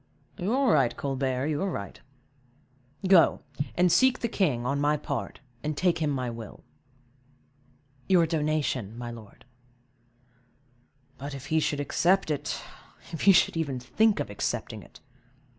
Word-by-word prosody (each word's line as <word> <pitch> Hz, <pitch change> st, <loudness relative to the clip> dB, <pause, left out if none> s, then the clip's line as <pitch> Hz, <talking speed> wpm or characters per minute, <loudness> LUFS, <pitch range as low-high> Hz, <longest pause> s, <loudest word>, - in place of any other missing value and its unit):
"You 190 Hz, +4 st, -1 dB
are 265 Hz, -3 st, +3 dB
right, 120 Hz, -3 st, +2 dB
Colbert, 135 Hz, -1 st, -1 dB
you 150 Hz, -1 st, -1 dB
are 195 Hz, -, 0 dB
right; 100 Hz, -, -6 dB, 1.1 s
go, 185 Hz, -3 st, +5 dB, 0.3 s
and 180 Hz, 0 st, +3 dB
seek 255 Hz, +8 st, +4 dB
the 235 Hz, -, -2 dB
king, 150 Hz, -, 0 dB
on 140 Hz, +3 st, 0 dB
my 150 Hz, +1 st, +2 dB
part, 145 Hz, -, -5 dB, 0.2 s
and 150 Hz, -1 st, -3 dB
take 180 Hz, 0 st, +2 dB
him 155 Hz, -2 st, 0 dB
my 130 Hz, -3 st, -2 dB
will." 115 Hz, -2 st, -8 dB, 1.5 s
"Your 180 Hz, -3 st, +5 dB
donation, 150 Hz, -, -1 dB
my 120 Hz, 0 st, -5 dB
lord." 110 Hz, -3 st, -13 dB, 1.7 s
"But, 140 Hz, +1 st, -6 dB
if 135 Hz, 0 st, -9 dB
he 160 Hz, -, +4 dB
should 150 Hz, -1 st, -1 dB
accept 175 Hz, +4 st, +2 dB
it; 145 Hz, -, -3 dB, 0.5 s
if 165 Hz, -, -5 dB
he 200 Hz, -, +7 dB
should 185 Hz, -, +4 dB
even 145 Hz, -6 st, -2 dB
think 200 Hz, -, +2 dB
of 145 Hz, -, -3 dB
accepting 100 Hz, -, -3 dB
it!" -, -, -17 dB
150 Hz, 145 wpm, -27 LUFS, 130-175 Hz, 1.7 s, he